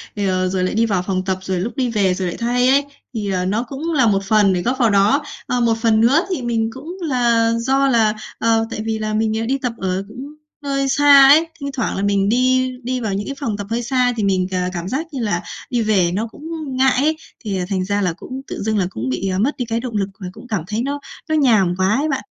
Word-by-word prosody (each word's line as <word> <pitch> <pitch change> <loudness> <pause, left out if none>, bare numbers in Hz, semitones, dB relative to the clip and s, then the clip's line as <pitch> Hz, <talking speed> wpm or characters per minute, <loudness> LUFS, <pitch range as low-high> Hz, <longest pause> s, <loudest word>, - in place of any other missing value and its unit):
ờ, 185 -2 0
rồi 185 0 -1
lại 185 - -1
đi 230 +1 +3
vào 195 -5 0
phòng 185 -1 -1
tập, 190 -1 0
rồi 190 -1 -2
lúc 210 +7 -3
đi 260 -3 0
về 200 -5 +2
rồi 185 0 -2
lại 175 - -4
thay 245 +2 +1
ấy, 280 +2 +4 0.3
thì, 210 -4 -3
ờ, 180 -1 -1
nó 210 +5 0
cũng 285 +6 -4
là 260 -6 +3
một 195 -2 +2
phần 200 -1 +3
để 180 - 0
góp 250 +5 -1
vào 230 - +4
đó. 205 +8 +3 0.2
Ờ, 250 - 0
một 230 -1 +2
phần 220 -2 +3
nữa 280 +10 +4
thì 355 -9 -2
mình 230 -2 0
cũng 320 +8 -8
là 240 -7 +2
do 270 +3 +2
là, 225 -4 +3 0.3
ờ, 225 0 +2
tại - - -4
vì 220 -1 -2
là 215 0 -2
mình, 215 0 +1
ờ, 225 - -2
đi 265 +4 0
tập 250 -4 -3
ở 190 -1 -2
cũng 260 +7 -9 0.3
hơi 275 -1 -1
xa 285 0 +7
ấy, 315 +4 +6
thi 280 - -6
thoảng 245 - -2
là 195 - -1
mình 200 0 +2
đi 255 +2 +2
đi 255 +1 -2
vào 215 -4 -2
những 200 +1 -3
cái 275 - -4
phòng 225 -7 -2
tập 205 -1 -6
hơi 235 +2 -1
xa 250 0 +1
thì 210 - -1
mình 185 -2 +1
c - - -17 0.2
cảm 175 +1 -4
giác 280 +8 -2
như 270 - -3
là 205 -6 0 0.3
đi 240 -2 0
về 195 -6 +2
nó 215 +5 -1
cũng - - -15 0.4
ngại 265 0 +4
ấy, 310 +1 +1 0.2
thì, 205 -5 -3
ờ, 180 - -2
thành 185 -2 -1
ra 205 +1 0
là 180 -4 0
cũng 260 +9 -8
tự - - -6
dưng 215 0 0
là 185 -3 +1
cũng 125 - -4
bị, 130 +10 -2
ờ, 185 - -1
mất 260 +8 0
đi 245 - -2
cái 230 0 -2
động 240 -2 -6
lực 195 -1 -1
và 185 - -6
cũng 250 - -13
cảm 205 -8 -2
thấy 215 +2 -2
nó 285 +2 -3 0.3
nó 315 - +2
nhàm 215 - +3
quá 190 +3 +2
ấy 295 +5 0
bạn. 270 -2 -1
225 Hz, 275 wpm, -19 LUFS, 195-260 Hz, 0.4 s, xa